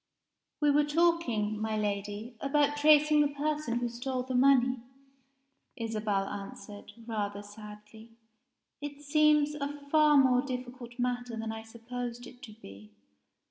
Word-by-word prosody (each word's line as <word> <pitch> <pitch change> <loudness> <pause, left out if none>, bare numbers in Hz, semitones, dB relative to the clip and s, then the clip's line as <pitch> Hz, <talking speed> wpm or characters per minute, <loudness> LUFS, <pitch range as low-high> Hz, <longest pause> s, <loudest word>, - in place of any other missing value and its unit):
"We 295 -1 +4
were 295 +1 +4
talking, 295 -10 +1
my 220 0 -1
Lady, 205 +3 -3
about 290 +1 +2
tracing 300 0 +5
the 295 - +4
person 290 -3 -2
who 240 0 -1
stole 250 +2 -3
the 260 0 -5
money," 255 -1 +4 1.0
Isabel 215 -4 -2
answered, 205 +1 -9
rather 205 -3 -3
sadly. 210 +1 -12 0.7
"It 290 0 -7
seems 300 0 +3
a 290 -1 -3 0.2
far 305 -1 +5
more 255 -2 +5
difficult 250 -2 -7
matter 245 -1 -2
than 225 0 -3
I 220 0 -6
supposed 240 +2 -7
it 250 - -14
to 240 -6 -10
be. 105 - -13
245 Hz, 135 wpm, -30 LUFS, 215-290 Hz, 1.0 s, tracing